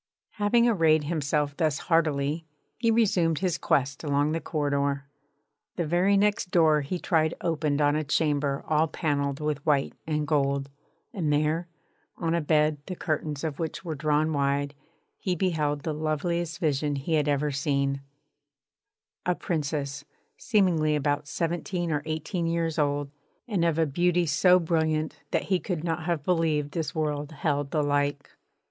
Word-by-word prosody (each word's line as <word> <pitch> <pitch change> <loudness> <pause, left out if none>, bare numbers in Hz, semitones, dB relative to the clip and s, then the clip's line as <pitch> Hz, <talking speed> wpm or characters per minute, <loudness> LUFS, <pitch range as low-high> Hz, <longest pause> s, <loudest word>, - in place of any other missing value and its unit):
Having 235 +3 +4
arrayed 160 -8 +4
himself 145 -2 -1
thus 155 -4 +1
hardily, 155 -1 0 0.3
he 230 -1 0
resumed 190 -8 +3
his 180 -1 -1
quest 135 +1 0
along 145 0 +1
the 165 +1 -1
corridor. 140 -2 -1 0.7
The 170 - -1
very 180 +5 +3
next 205 -2 +1
door 160 -4 +4
he 145 +6 -3
tried 160 -2 +1
opened 150 -3 0
on 145 0 +3
a 155 - 0
chamber 145 -2 0
all 155 +1 +3
panelled 140 -4 -1
with 150 -2 -2
white 145 -3 +1
and 150 -1 0
gold; 140 -1 0 0.4
and 165 -8 -1
there, 155 +3 +1 0.5
on 165 -2 -1
a 170 - +1
bed 150 0 +2
the 185 - -4
curtains 155 -3 -2
of 155 -3 -3
which 165 +2 -4
were 165 - -2
drawn 155 +1 +1
wide, 140 0 0 0.5
he 185 -2 -1
beheld 155 -5 0
the 160 - -2
loveliest 160 +2 -1
vision 145 -2 0
he 140 +4 -3
had 150 -2 +2
ever 145 +1 +1
seen: 140 0 0 1.3
a 180 - +2
Princess, 145 -4 -3 0.3
seemingly 175 -9 +2
about 145 0 0
seventeen 175 +1 -2
or 150 -1 0
eighteen 160 +2 -2
years 165 -1 -1
old, 145 -1 0 0.4
and 200 -7 0
of 165 -2 +2
a 165 - +3
beauty 175 +4 +1
so 180 +4 +5
brilliant 160 -2 0
that - - 0
he 185 -2 +1
could 175 -5 -3
not 165 -1 -2
have 170 -4 -1
believed 155 -4 +1
this 160 0 -3
world 150 -2 -2
held 145 -2 -1
the 150 0 0
like. 145 0 0
155 Hz, 155 wpm, -27 LUFS, 145-170 Hz, 1.3 s, so